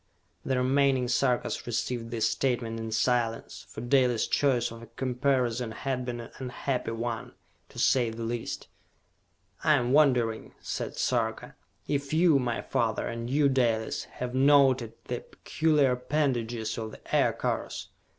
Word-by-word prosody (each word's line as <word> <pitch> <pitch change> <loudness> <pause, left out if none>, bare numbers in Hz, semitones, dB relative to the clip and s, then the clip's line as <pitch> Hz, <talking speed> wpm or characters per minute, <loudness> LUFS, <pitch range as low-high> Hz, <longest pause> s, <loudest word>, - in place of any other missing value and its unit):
"The 130 - 0
remaining 130 0 +2
Sarkas 125 -1 0
received 120 0 -2
this 115 -2 +1
statement 120 -4 -1
in 115 0 -4
silence, 115 0 -1
for - - -8
Dalis' 125 -2 +3
choice 130 -6 +1
of 115 0 -9
a 115 - -11
comparison 125 -1 0
had 130 0 -3
been 120 -1 -4
an 115 - -10
unhappy 130 -1 -3
one, 115 0 -4 0.4
to - - -15
say 125 -3 +3
the 115 +1 -6
least. 115 0 -4 1.0
"I 155 -1 +5
am 125 -2 0
wondering," 125 -7 +2
said - - -5
Sarka, 115 -3 -1 0.3
"if 140 0 -2
you, 160 -4 +5
my 120 -2 -2
father, 110 -2 0
and 115 0 -4
you 145 +2 +3
Dalis, 120 -5 0
have 125 0 -6
noted 130 -3 +4
the - - -3
peculiar 150 -4 +1
appendages 125 -4 -1
of 110 -1 -4
the - - -5
Aircars?" - - 0
125 Hz, 140 wpm, -28 LUFS, 115-135 Hz, 1.0 s, I